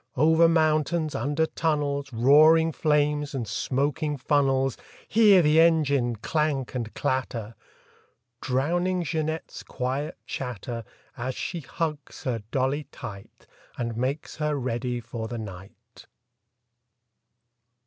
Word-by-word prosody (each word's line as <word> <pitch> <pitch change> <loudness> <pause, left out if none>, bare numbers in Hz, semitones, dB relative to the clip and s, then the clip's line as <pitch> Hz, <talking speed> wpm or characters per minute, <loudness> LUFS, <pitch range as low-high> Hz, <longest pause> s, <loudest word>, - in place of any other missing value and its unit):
Over 160 +4 +5
mountains, 155 0 +2
under 145 +7 0
tunnels, 145 -4 -1
Roaring 155 +7 +5
flames 150 -1 +1
and 120 -4 -3
smoking 145 +7 -1
funnels— 135 -1 +1 0.3
Hear 205 -5 +6
the 150 +1 +4
engine 140 -7 +3
clank 145 +3 -1
and 115 -3 -3
clatter! 120 -4 -2 0.9
Drowning 175 +8 0
Jeanette's 160 0 -3
quiet 130 +4 -3
chatter 120 -2 -5 0.3
As 130 +2 -4
she 175 - -4
hugs 155 -1 -5
her 120 -4 -2
dolly 135 +3 0
tight 100 -1 -10 0.3
And 115 -2 -3
makes 130 +5 -3
her 150 -1 0
ready 125 -2 -2
for 115 -1 -6
the 120 +1 -5
night. 95 -3 -11
140 Hz, 105 wpm, -26 LUFS, 125-155 Hz, 0.9 s, Hear